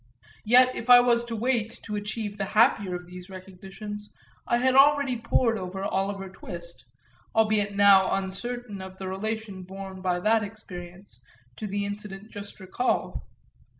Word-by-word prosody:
Yet 250 +3 +6
if 235 - -6
I 245 0 +11
was 240 -1 +3
to 235 -1 -4
wait 230 -1 -1
to 210 - -5
achieve 210 0 -4
the 195 - 0
happier 205 -6 +4
of 175 0 -7
these 180 +1 -11
recognitions 195 +3 -9 0.4
I 240 - +3
had 255 +1 +2
already 280 -1 +5
pored 230 -1 +1
over 190 +1 -5
Oliver 195 0 -2
Twist 170 -4 -9 0.5
albeit 215 -2 +2
now 200 -1 +6
uncertain 205 +2 -5
of 190 0 -9
the 190 - -6
relation 210 0 -4
borne 190 0 -8
by 180 -1 0
that 220 +3 +3
experience 185 - -9 0.4
to 215 - -4
the 200 0 -2
incident 205 0 -7
just 205 0 -9
recalled. 190 +6 -1
205 Hz, 150 wpm, -26 LUFS, 190-225 Hz, 0.5 s, I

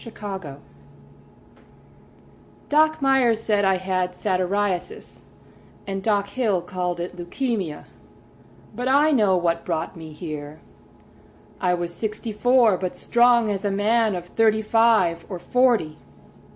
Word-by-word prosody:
Isa 230 - -9
Nutter 190 -9 -6 2.1
Doc 310 0 +3
Meyers 260 -5 +3
said 210 -2 0
I 190 -1 +3
had 185 -1 -2
satyriasis, 185 -1 -2 0.6
And 195 -1 -4
Doc 205 -1 +1
Hill 205 -6 0
called 180 -1 -3
it 175 +1 -5
leucæmia— 180 - -3 0.9
But 245 +3 -3
I 290 +4 +4
know 210 -9 +3
what 170 -1 0
brought 165 +1 -3
me 160 -2 -10
here: 150 -1 -8 1.0
I 180 -2 +1
was 175 0 -4
sixty 220 +3 -4
four 240 -2 +3
but 185 -1 -4
strong 240 -1 +3
as 200 0 -3
a 205 - 0
man 215 +1 +1
Of 175 -1 -6
thirty 220 -1 +2
five 215 -7 +2
or 185 - -5
forty. 225 -7 +1
200 Hz, 125 wpm, -23 LUFS, 175-230 Hz, 2.1 s, I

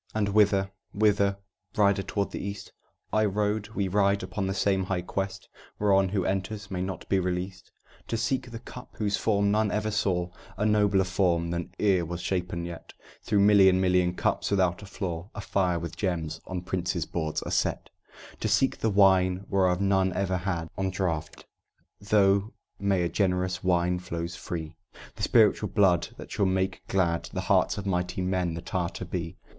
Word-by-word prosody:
"And 105 -2 +1
whither, 100 -2 +3 0.2
whither, 100 -1 +3 0.4
rider 100 -1 +4
toward 100 +1 -2
the - - -5
east?" 100 0 -6 0.4
"I 110 - +3
rode 105 +1 -1
we 100 -1 0
ride 100 +1 +2
upon 100 -2 -3
the 95 - -1
same 95 -1 +1
high 90 -2 -2
quest, 95 +1 -4 0.3
Whereon 95 -2 +3
who 95 -1 -1
enters 100 +2 -3
may 90 -1 -2
not 95 -1 -5
be 95 - +2
released; 90 0 -4 0.4
"To 115 - -1
seek 125 +2 -1
the 115 - -7
Cup 125 +2 -11
whose 105 -2 0
form 100 -2 +2
none 110 0 +2
ever 105 +1 -1
saw, 90 -4 0 0.3
A 105 - 0
nobler 105 -2 +3
form 90 -3 +1
than 85 0 -3
e'er 95 -4 +3
was 85 +1 -5
shapen 90 -2 -2
yet, 85 -1 -9 0.3
Though 105 - +2
million 100 -2 +6
million 90 -1 +2
cups - - 0
without 95 -2 +1
a 100 - -10
flaw, 90 -2 -5
Afire 95 -3 0
with 85 0 -5
gems, 85 -4 -2
on 90 -1 -4
princes' 90 -2 -2
boards 80 -2 -3
are - - -5
set; - - -1 0.5
"To - - -1
seek 135 - +2
the 110 - +1
Wine 95 -2 +4
whereof 95 -3 +2
none 95 -1 +2
ever 95 0 0
had 85 -3 -3
One 95 0 -1
draught, 85 -5 -3 0.5
though 100 0 +2 0.3
many 100 -3 +1
a - - +1
generous 95 -1 0
wine 90 0 +2
flows 85 -1 -5
free, 85 -1 -6 0.4
The - - -10
spiritual 105 -2 +4
blood 95 -5 +3
that - - -10
shall 100 -2 +1
make 95 0 0
glad 85 -3 0
The - - -3
hearts - - +2
of 100 - -5
mighty 90 -1 -1
men 90 -2 0
that 80 - -8
are 90 -2 0
to - - -7
be." 85 -3 -5
95 Hz, 180 wpm, -27 LUFS, 90-100 Hz, 0.5 s, million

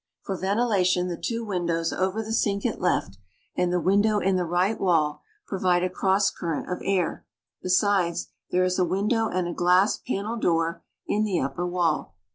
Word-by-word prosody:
For 195 - -3
ventilation 190 -3 +1
the 175 - -2
two 230 +5 -3
windows 170 -4 -1
over 190 +4 -1
the 220 +1 -5
sink 200 -2 0
at 235 - -1
left 100 - 0 0.4
and 180 -1 +1
the 180 - +1
window 205 +4 +3
in 195 -2 +1
the 180 -1 0
right 180 +6 +1
wall 160 -5 +1 0.2
provide 180 -2 +1
a 185 - -1
cross 195 +1 +2
current 165 -4 -4
of 180 - -3
air. 190 -3 0 0.4
Besides, 185 -2 +1 0.2
there 180 +1 +2
is 185 +1 0
a - - +4
window 210 +5 +1
and 180 -1 -1
a 175 - -3
glass 180 +4 +3
panel 220 0 -3
door 165 -5 0 0.2
in 210 +1 0
the 200 -5 0
upper 140 +7 -2
wall. 175 - -1
185 Hz, 180 wpm, -25 LUFS, 175-200 Hz, 0.4 s, a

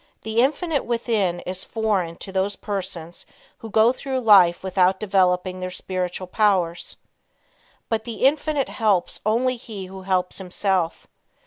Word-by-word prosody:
The 220 +1 -1
Infinite 285 +3 +1
within 220 -7 0
is 185 +1 -4
foreign 205 -7 -1
to 195 - -9
those 190 +1 0
persons 185 -5 -6 0.4
who 225 - -8
go 220 +3 +4
through 260 0 -3
life 190 -7 +6
without 190 0 +2
developing 185 -2 +1
their 185 0 -4
spiritual 185 0 -4
powers. 180 -3 0 0.9
But 220 -1 -1
the 235 +1 -2
Infinite 290 0 +1
helps 205 -6 0
only 250 +3 +1
he 210 -4 -8
who 190 +1 -10
helps 185 -1 -1
himself. 185 -2 -1
195 Hz, 135 wpm, -23 LUFS, 185-225 Hz, 0.9 s, life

